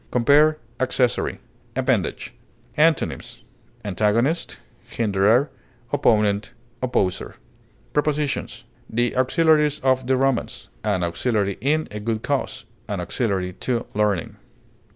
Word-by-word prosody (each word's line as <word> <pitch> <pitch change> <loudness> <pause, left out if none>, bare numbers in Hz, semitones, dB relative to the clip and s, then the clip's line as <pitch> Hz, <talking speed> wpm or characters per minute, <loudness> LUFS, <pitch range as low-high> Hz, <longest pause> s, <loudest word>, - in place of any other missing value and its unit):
Compare 145 +6 +4 0.2
ACCESSORY; 130 -1 0 0.4
APPENDAGE. - - -1 0.4
Antonyms: 160 +1 +1 0.4
antagonist, 110 - 0 0.3
hinderer, 110 +5 +2 0.4
opponent, 105 -6 +2 0.3
opposer. 110 -8 -1 0.6
Prepositions: 150 -1 -1 0.3
The 120 +1 0
auxiliaries 150 +3 +3
of 130 -1 +1
the 130 0 +3
Romans; 135 -2 -1
an 100 -4 0
auxiliary 100 +3 -1
in 155 +4 +1
a 105 - -5
good 110 +1 -2
cause; - - -2 0.2
an 100 -2 -3
auxiliary 90 0 -1
to 120 -2 -1
learning. 105 -5 0
120 Hz, 95 wpm, -23 LUFS, 105-140 Hz, 0.6 s, Compare